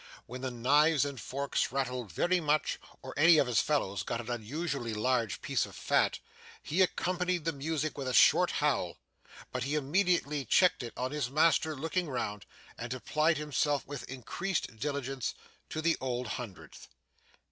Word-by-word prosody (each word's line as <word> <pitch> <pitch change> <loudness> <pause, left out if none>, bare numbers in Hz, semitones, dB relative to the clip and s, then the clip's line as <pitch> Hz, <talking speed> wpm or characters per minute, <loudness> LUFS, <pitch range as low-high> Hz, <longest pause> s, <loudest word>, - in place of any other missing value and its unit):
When 125 +2 -8
the 130 - -2
knives 145 +5 +3
and 140 -3 -5
forks 140 +1 -1
rattled 125 -5 -2
very 180 - +2
much, 155 -2 +1 0.2
or - - -7
any 160 +3 +7
of 140 - +4
his 120 -3 +2
fellows 100 - 0
got 115 +6 -3
an 120 0 -5
unusually 120 0 -3
large 115 -1 0
piece - - +1
of - - -13
fat, - - +2 0.5
he 175 +6 0
accompanied 180 -2 0
the 165 - 0
music 150 +1 -2
with 135 - -3
a - - 0
short - - +6
howl, - - 0 0.5
but 125 - -3
he 140 +5 -1
immediately 150 -1 +1
checked 180 +6 +4
it 120 -2 -6
on 130 +1 -2
his 145 -4 -2
master 160 +1 +3
looking 160 +4 -2
round, 105 -6 -3 0.3
and 120 +2 -4
applied 155 +5 +1
himself 145 -1 0
with 145 -1 -7
increased 135 +3 -3
diligence 135 -1 -3 0.3
to 155 - -4
the 165 0 +3
Old 125 -2 -2
Hundredth. 115 -6 -7
140 Hz, 165 wpm, -31 LUFS, 125-155 Hz, 0.5 s, any